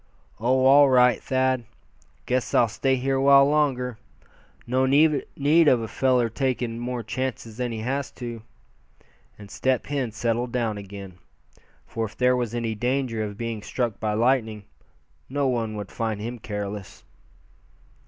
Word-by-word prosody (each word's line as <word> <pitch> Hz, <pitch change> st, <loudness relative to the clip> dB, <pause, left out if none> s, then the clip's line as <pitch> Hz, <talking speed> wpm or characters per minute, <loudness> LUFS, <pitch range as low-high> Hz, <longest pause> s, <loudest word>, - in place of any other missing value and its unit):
"Oh! 130 Hz, +3 st, +2 dB
all 140 Hz, +1 st, +7 dB
right, 125 Hz, -3 st, +4 dB
Thad. 130 Hz, -1 st, 0 dB, 0.6 s
Guess 125 Hz, 0 st, -1 dB
I'll 120 Hz, -, +5 dB
stay 130 Hz, +3 st, -1 dB
awhile 140 Hz, +1 st, +5 dB
longer. 130 Hz, -6 st, 0 dB, 0.7 s
No 130 Hz, +2 st, +1 dB
need 150 Hz, +2 st, +3 dB
of 130 Hz, -4 st, +5 dB
a 115 Hz, -, -4 dB
feller 125 Hz, 0 st, +2 dB
takin' 120 Hz, -1 st, -2 dB
more 120 Hz, 0 st, -4 dB
chances 115 Hz, -1 st, -4 dB
than 125 Hz, -1 st, -2 dB
he 110 Hz, -1 st, -4 dB
has 135 Hz, +4 st, -2 dB
to," 120 Hz, -2 st, -7 dB, 1.0 s
and 100 Hz, -1 st, -12 dB
Step 130 Hz, -1 st, 0 dB
Hen 135 Hz, -5 st, -2 dB
settled 120 Hz, +2 st, -1 dB
down 115 Hz, -4 st, -1 dB
again; 100 Hz, -2 st, -10 dB, 0.7 s
for 115 Hz, -1 st, -3 dB
if 100 Hz, -, -10 dB
there 125 Hz, 0 st, +3 dB
was 120 Hz, -2 st, -2 dB
any 115 Hz, -2 st, -2 dB
danger 120 Hz, 0 st, -1 dB
of 105 Hz, -1 st, -6 dB
being 115 Hz, -2 st, -4 dB
struck 120 Hz, -1 st, -3 dB
by 105 Hz, -1 st, -1 dB
lightning, 110 Hz, -2 st, +1 dB, 0.7 s
no 140 Hz, +1 st, 0 dB
one 115 Hz, -4 st, -1 dB
would 105 Hz, -2 st, -6 dB
find 110 Hz, -3 st, -3 dB
him 120 Hz, +3 st, -5 dB
careless. 105 Hz, -2 st, -6 dB
120 Hz, 145 wpm, -24 LUFS, 110-130 Hz, 1.0 s, all